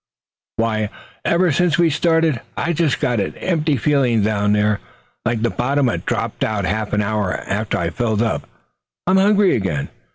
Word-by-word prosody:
Why, 110 -2 0 0.3
ever 175 0 +2
since 170 +2 +2
we 170 -2 +3
started, 160 -3 +2 0.2
I've 170 0 0
just 160 -6 +1
got 120 -3 +1
an 100 - -2
empty 155 -5 0
feeling 125 -5 +2
down 105 -1 +1
there, 105 0 +2 0.5
like 120 -2 0
the 120 - +1
bottom 135 +1 +1
had - - -4
dropped - - -2
out. 100 -3 -1
Half 110 +2 -2
an 105 0 +2
hour 105 -2 -1
after 105 +2 -2
I 85 -1 -1
fill 110 +1 0
up, 115 - -2 0.6
I'm 185 +1 +3
hungry 200 0 +4
again. 85 -10 -2
120 Hz, 170 wpm, -20 LUFS, 105-160 Hz, 0.6 s, hungry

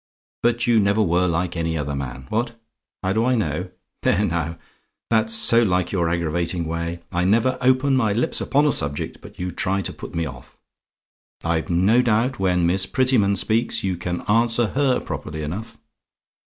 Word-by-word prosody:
But 120 0 +1
you 120 -2 +4
never 100 +1 +2
were 90 0 +2
like 85 +1 -1
any 80 -1 -1
other 70 -1 -3
man! 65 -1 -6
What? 115 +1 -2 0.4
"HOW 95 +1 +1
DO 110 +2 +1
I 125 +1 +2
KNOW? 90 -4 -2 0.3
"There 105 - +2
now 85 -2 -2 0.5
that's 110 -1 +2
so 115 +1 +5
like 90 -5 +1
your 85 -4 0
aggravating 85 +1 -1
way. 85 +1 -4
I 90 0 0
never 115 +7 +2
open 130 +2 +3
my 115 -5 +2
lips 115 +4 0
upon 145 +2 +2
a 150 - +4
subject 70 - -2
but - - -14
you 90 0 -3
try 95 +3 -1
to - - -4
put - - -9
me 85 0 0
off. - - -10 0.9
I've 85 -1 -1
no 95 +8 +4
doubt 120 +2 +1
when 90 -2 +2
Miss 95 +2 +2
Prettyman 125 -7 +2
speaks, 115 +4 +1
you 95 -2 0
can 90 0 -4
answer 115 +1 +2
HER 135 -2 +2
properly 75 0 -6
enough. 95 +9 -6
95 Hz, 180 wpm, -22 LUFS, 85-115 Hz, 0.9 s, so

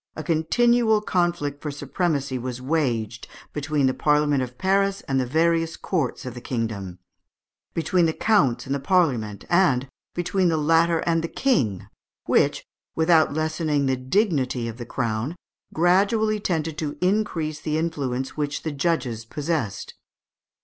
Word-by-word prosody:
a 155 - -5
continual 220 +8 +3
conflict 175 -8 -1
for 150 - -4
supremacy 145 -2 -2
was 125 0 -4
waged 120 -6 -1 0.3
between 150 -1 0
the 130 - +2
Parliament 150 -1 +2
of 125 -1 -5
Paris 195 +1 +1
and 135 -1 -1
the 130 - -1
various 165 +3 +1
courts 155 -11 -2
of 125 - -5
the 120 - -9
kingdom 110 -8 -4 0.8
between 170 +1 +2
the - - +1
counts 145 - +2
and 135 - -2
the 140 - -1
Parliament, 130 - +1
and 140 -8 +3 0.3
between 180 +1 +1
the 165 -2 +2
latter 165 +2 +3
and 165 -1 +1
the - - -1
King, 130 - 0 0.4
which, - - +2 0.3
without 160 -2 +3
lessening 155 -2 0
the 130 -1 +2
dignity 130 - 0
of 115 0 -6
the 120 -2 -7
crown, 120 +5 -2 0.4
gradually 200 +6 +2
tended 160 -5 -2
to 150 -2 -3
increase 180 -6 0
the 155 0 -1
influence 135 -6 -2
which 145 -1 -3
the 160 - -2
judges 140 -6 -1
possessed. 145 - -3
155 Hz, 145 wpm, -24 LUFS, 130-170 Hz, 0.8 s, continual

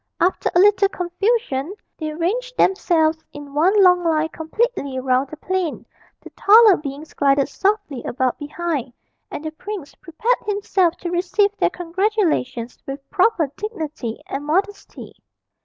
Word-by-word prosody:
After 360 +2 +1
a - - +6
little 400 0 +5
confusion, 360 - -1 0.2
they 310 -1 -3
ranged 455 +11 -2
themselves 320 -4 +2
in 290 -1 -10
one 375 +7 +4
long 360 -1 +5
line 320 -1 +1
completely 320 - -2
round 260 +1 +1
the 310 - -9
plain; 370 0 -3 0.4
the - - -13
taller 430 -1 +6
beings 295 0 -8
glided 275 -1 +2
softly 390 - -1
about 255 0 -1
behind, 290 -4 -3 0.4
and 305 - -7
the 315 - -3
prince 345 -1 -7
prepared 380 +8 -1
himself 390 -4 +1
to 345 - -4
receive 380 +3 +1
their - - +2
congratulations 345 - -1
with 275 0 -7
proper 370 - +2
dignity 310 - -5
and 275 - -5
modesty. 385 +7 -3
340 Hz, 140 wpm, -21 LUFS, 290-400 Hz, 0.4 s, a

